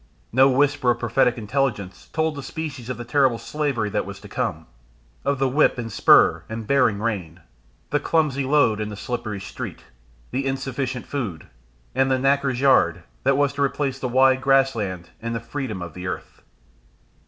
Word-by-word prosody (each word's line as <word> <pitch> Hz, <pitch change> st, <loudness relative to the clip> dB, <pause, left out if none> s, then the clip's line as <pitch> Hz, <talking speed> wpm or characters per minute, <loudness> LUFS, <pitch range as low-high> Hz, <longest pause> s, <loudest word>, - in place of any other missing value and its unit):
No 130 Hz, +3 st, +5 dB
whisper 135 Hz, -1 st, +2 dB
of 120 Hz, -, +3 dB
prophetic 120 Hz, +1 st, +2 dB
intelligence 105 Hz, -6 st, -2 dB
told 160 Hz, 0 st, 0 dB
the 140 Hz, -, -6 dB
species 140 Hz, -3 st, -6 dB
of 130 Hz, -, -3 dB
the 120 Hz, -, -7 dB
terrible 130 Hz, -1 st, +3 dB
slavery 140 Hz, -6 st, -2 dB
that 105 Hz, -, 0 dB
was 100 Hz, 0 st, -8 dB
to 105 Hz, -, -11 dB
come, 100 Hz, -8 st, -3 dB, 0.6 s
of 140 Hz, 0 st, 0 dB
the 135 Hz, 0 st, +2 dB
whip 140 Hz, +2 st, +3 dB
and 115 Hz, -2 st, -4 dB
spur 85 Hz, -4 st, +5 dB
and 110 Hz, 0 st, -5 dB
bearing 125 Hz, -5 st, +2 dB
rein, 95 Hz, -7 st, -3 dB, 0.5 s
the 145 Hz, -, +2 dB
clumsy 150 Hz, -4 st, +1 dB
load 130 Hz, -6 st, +3 dB
and 105 Hz, 0 st, -3 dB
the -, -, -6 dB
slippery 110 Hz, 0 st, -4 dB
street, 95 Hz, -, -7 dB, 0.5 s
the 130 Hz, +2 st, -1 dB
insufficient 135 Hz, -1 st, -3 dB
food, 105 Hz, -, -4 dB, 0.5 s
and 135 Hz, 0 st, +2 dB
the 130 Hz, -, +3 dB
knacker's 135 Hz, -1 st, +1 dB
yard, 85 Hz, -11 st, +4 dB, 0.2 s
that 135 Hz, +1 st, +2 dB
was 145 Hz, -1 st, +2 dB
to 140 Hz, -, -4 dB
replace 140 Hz, -1 st, 0 dB
the 130 Hz, -, -2 dB
wide 130 Hz, +1 st, +4 dB
grass 135 Hz, 0 st, +4 dB
land 95 Hz, -6 st, -5 dB
and 115 Hz, +1 st, -3 dB
the -, -, -1 dB
freedom 115 Hz, -5 st, -5 dB
of 85 Hz, -3 st, -8 dB
the 90 Hz, 0 st, -6 dB
earth. 90 Hz, -3 st, -6 dB
125 Hz, 180 wpm, -23 LUFS, 105-135 Hz, 0.6 s, No